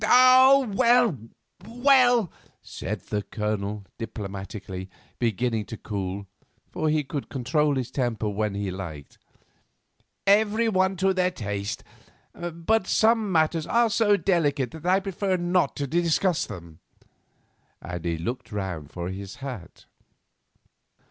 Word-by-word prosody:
"Oh, 255 +3 +7
well, 240 - +4 0.5
well," 245 - +4 0.3
said - - -5
the 105 - -3
Colonel, 105 -1 -3
diplomatically 100 -3 -6 0.3
beginning 115 -1 0
to 115 - -8
cool, 100 -1 -4 0.5
for 155 - -1
he 155 0 +1
could 140 0 -5
control 145 +3 +1
his 130 -2 -3
temper 120 -5 -1
when 105 0 -1
he 100 -1 -2
liked. 85 -7 -8 1.1
"Everyone 205 -2 +3
to 190 +1 +2
their 185 -1 +2
taste; 100 - -4 0.5
but 175 +5 -1
some 220 -2 +3
matters 160 -1 +1
are 235 -1 +3
so 205 -2 +3
delicate 145 - +1
that 160 +2 -8
I 190 +1 +4
prefer 190 0 -1
not 175 -3 +1
to 145 - -2
discuss 170 +3 +1
them," 85 -6 -10 1.0
and 90 -1 -6
he 85 -1 -1
looked 120 +10 -5
round 95 -8 -4
for 85 +1 -5
his 95 +1 -7
hat. 130 -11 -8
145 Hz, 120 wpm, -25 LUFS, -, 1.1 s, Oh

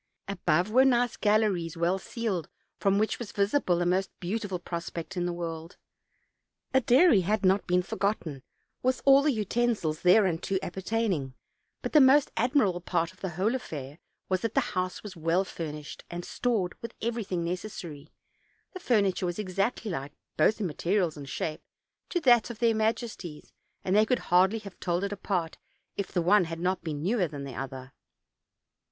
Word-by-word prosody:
Above 180 0 +1
were 255 +4 +6
nice 245 -2 +3
galleries, 205 -6 +1
well 175 +3 +1
ceiled, 200 -8 -3 0.3
from 195 0 +2
which 215 +1 0
was 235 -4 -6
visible 200 -2 +1
the 175 - 0
most 185 +2 +1
beautiful 195 +1 -3
prospect 170 +1 -6
in 175 -1 -1
the - - -1
world. 165 -1 -6 1.0
A 265 - +5
dairy 255 - +5
had 205 +2 0
not 190 +2 +3
been 180 0 +2
forgotten, 180 -8 -2 0.4
with 255 0 0
all 275 0 +7
the 300 +1 +3
utensils 215 - 0
thereunto 185 -1 +3
appertain 210 +4 -1
ing; 135 -5 -4 0.5
but - - -4
the 305 - +8
most 270 +2 +5
admirable 225 -7 +2
part 170 0 -1
of 185 - -24
the 190 - -2
whole 205 +6 +2
affair 150 - -6 0.3
was, 185 -1 0
that 230 -1 -2
the 270 -3 +1
house 185 0 -2
was 210 -3 -8
well 165 +3 +1
furnished 150 -5 -7
and 175 0 -6
stored 215 -8 -1
with 230 - -7
every 235 0 -2
thing 180 -3 -2
necessary; 170 -4 -6 0.6
the 370 - -7
furniture 200 - +1
was 175 - -3
exactly 200 +2 -1
like, 140 -2 -5 0.2
both 185 +8 +3
in 210 - -1
materials 175 +1 0
and 140 -2 -9
shape, 155 +2 -3 0.5
to 350 - 0
that 245 -7 +4
of 235 - -7
their 230 0 +3
majesties, 220 -7 -3 0.3
and 185 - +1
they 215 +1 +5
could 250 - +2 0.2
hardly 190 +5 +5
have 200 -4 -10
told 175 +1 -1
it 200 - -2
apart, 185 -4 -2 0.4
if 200 - -4
the 175 -3 0
one 190 +1 +5
had 165 0 -6
not 185 +1 -1
been 150 -3 -4
newer 195 -1 +1
than 145 -2 -7
the 135 -2 -7
other. 130 0 -7
190 Hz, 175 wpm, -28 LUFS, 170-220 Hz, 1.0 s, the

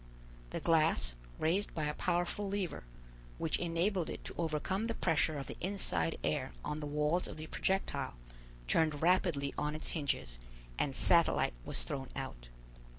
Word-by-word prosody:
The - - -3
glass, 160 - +3 0.2
raised 180 +6 +1
by 155 - -1
a 150 - 0
powerful 175 +5 0
lever, 195 - -2 0.5
which 160 - 0
enabled 175 +1 +1
it - - -6
to - - -6
overcome 170 +6 0
the 230 - -2
pressure 155 -1 +2
of 135 - -4
the - - -7
inside 130 - 0
air - - 0
on 150 - -2
the 150 - -4
walls 150 +4 +1
of - - -7
the 155 - -5
projectile, 160 - 0 0.5
turned 155 - +2
rapidly 170 -6 +3
on 150 +1 0
its 155 - -4
hinges, 140 - -2 0.4
and 135 -2 +1
Satellite 170 - +4
was - - 0
thrown 135 -2 -4
out. - - -5
160 Hz, 155 wpm, -34 LUFS, 145-175 Hz, 0.5 s, Satellite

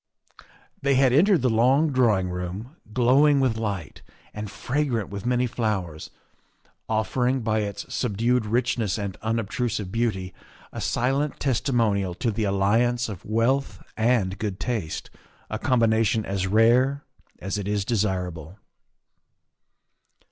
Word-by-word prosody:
' - - -23
' - - -33
They 140 0 +2
had 130 -1 +4
entered 170 - +4
the 130 - +3
long 130 +7 +3
drawing 110 -8 +2
room, 90 - -6 0.2
glowing 135 +5 +4
with 130 -4 +2
light 100 -7 -4 0.3
and 105 -1 -5
fragrant 125 -3 -2
with 100 +3 -6
many 125 0 +2
flowers, 105 -10 -3 0.8
offering 125 +4 0
by 110 -1 0
its 100 -1 -4
subdued 120 0 0
richness 115 -3 0
and 100 -3 -4
unobtrusive 110 -2 -2
beauty 95 -6 -1 0.4
a - - -6
silent 135 +4 0
testimonial 115 -8 0
to 115 +4 -1
the 110 +1 -1
alliance 115 +5 +1
of 100 -5 -7
wealth 115 +6 0 0.2
and 110 -5 +1
good 100 -3 -3
taste 105 -7 -3 0.4
a 110 - -2
combination 115 -4 +2
as 95 -1 -2
rare 120 +7 +3 0.3
as 95 +2 -3
it 100 - -4
is 100 -1 -1
desirable. 90 -6 -2
110 Hz, 130 wpm, -25 LUFS, 100-125 Hz, 0.8 s, had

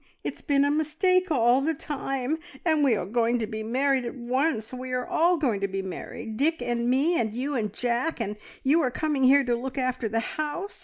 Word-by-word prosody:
It's - - -5
been 280 -2 +2
a 285 - +2
mistake 355 +5 +2
all 250 -3 +4
the 320 +3 0
time, 275 0 -3 0.3
and 315 -3 +3
we 260 -5 +4
are 200 - -2
going 235 +4 +1
to 230 - -1
be 220 0 -5
married 260 +4 +1
at 235 - -5
once. 250 -1 -1
We 255 0 -5
are 250 -1 -1
all 345 +2 +2
going 240 -10 0
to 200 - +1
be 195 0 -3
married! 215 +3 -6
Dick 320 +5 +1
and 240 -1 -1
me, 290 +7 +3
and 220 -2 -1
you 275 +4 -2
and 215 -4 -1
Jack, 245 +7 -1
and 210 -2 -2 0.3
you 300 +5 +4
are 260 - +1
coming 280 0 0
here 275 +2 +6
to 245 -2 +1
look 260 +3 -5
after 255 -3 -1
the 225 +2 0 0.2
house! 350 +7 -4
260 Hz, 220 wpm, -26 LUFS, 235-295 Hz, 0.3 s, here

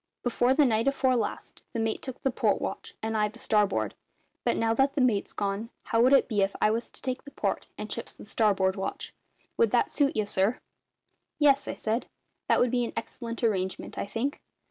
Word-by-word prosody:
"Before 245 +1 +2
the 295 0 +5
night 225 0 +2
afore 265 -2 +3
last, 235 - -3
the 230 - -2
mate 225 -1 -1
took 260 -1 -7
the 270 - +1
port - - +1
watch, - - -5
and 220 0 -1
I 210 -1 +3
the 215 +3 -11
starboard; 210 -3 +1 0.5
but - - +1
now 225 0 +2
that 270 +4 +2
the - - +1
mate's 230 -6 +2
gone, 205 +3 -2
how 230 -1 +1
would 255 +2 +5
it 275 - +6
be 210 -4 +1
if 195 0 +1
I 215 - +4
was 230 +2 -2
to - - -9
take 255 -1 -3
the 280 - -10
port - - -2
and - - -5
Chips - - -4
the - - -12
starboard 195 -4 +2
watch? 195 0 -4 0.4
Would 460 - +4
that - - +2
suit 285 -1 +2
ye, 215 - +1
sir?" 205 +4 +1 0.8
"Yes," 280 -2 +4
I - - -3
said, 225 +3 -1 0.4
"that - - +4
would 245 - +3
be 245 -1 +2
an 235 - -4
excellent 230 +1 -5
arrangement, 190 -4 -1
I - - -2
think. 235 +7 -2
230 Hz, 215 wpm, -28 LUFS, 210-255 Hz, 0.8 s, it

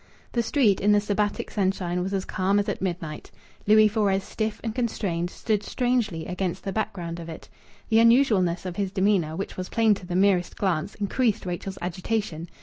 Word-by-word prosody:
The 235 - +1
street, 225 -4 +2
in 210 +2 +4
the 205 - +5
Sabbatic 205 0 -1
sunshine, 185 -3 0
was 190 +2 -3
as 195 -1 -1
calm 190 +2 +1
as 205 - +1
at - - -3
midnight. 170 -5 -4 0.4
Louis 215 0 +7
Fores, 200 -3 +1
stiff 215 +1 -3
and 225 -2 -2
constrained, 195 -8 -1
stood 210 +2 -1
strangely 235 -10 -1
against 180 -1 -3
the 195 - -3
background 180 -6 -3
of 165 0 -8
it. 160 - -9 0.4
The 225 - +5
unusualness 225 -8 +4
of 180 -1 -5
his 195 -2 -1
demeanour, 190 -5 +1
which 195 +3 -5
was 185 0 -4
plain 225 -2 +3
to 190 -3 -7
the 175 - -3
merest 185 -2 +2
glance, 190 -1 -1
increased 215 +1 0
Rachel's 185 +2 -4
agitation. 180 -2 -3
195 Hz, 185 wpm, -25 LUFS, 180-215 Hz, 0.4 s, Louis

